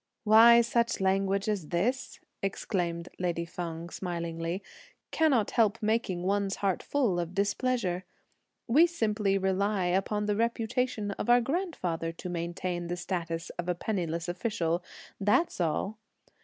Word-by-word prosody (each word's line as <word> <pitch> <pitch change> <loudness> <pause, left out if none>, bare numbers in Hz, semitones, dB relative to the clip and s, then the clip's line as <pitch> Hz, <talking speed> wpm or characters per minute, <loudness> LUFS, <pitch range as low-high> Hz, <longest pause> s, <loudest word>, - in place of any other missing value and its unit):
"Why, 230 +2 +8 0.4
language 195 +1 +1
such 215 - +1
as 190 -7 -3
this," 250 - -1 0.2
exclaimed 175 -3 -2
lady 170 -2 -1
Feng 170 0 -6
smilingly, 170 0 -3 0.5
"cannot 275 -10 +2
help 220 -1 +3
making 215 -5 0
one's 200 +1 0
heart 195 -3 0
full 240 -11 +1
of 175 +1 -4
displeasure! 200 -2 0 0.6
We 300 +9 +5
simply 210 - 0
rely 190 0 +1
upon 195 +4 0
the 210 0 +1
reputation 230 -1 -1
of 200 - -4
our 245 0 +7
grandfather 240 - -2
to 180 +2 -7
maintain 175 0 -3
the 175 +1 -3
status 170 -2 -3
of 175 0 -2
a 180 - +1
penniless 170 -4 -2
official; 175 -2 -1 0.4
that's 205 - +2
all! 190 +6 -1
195 Hz, 130 wpm, -29 LUFS, 175-220 Hz, 0.6 s, Why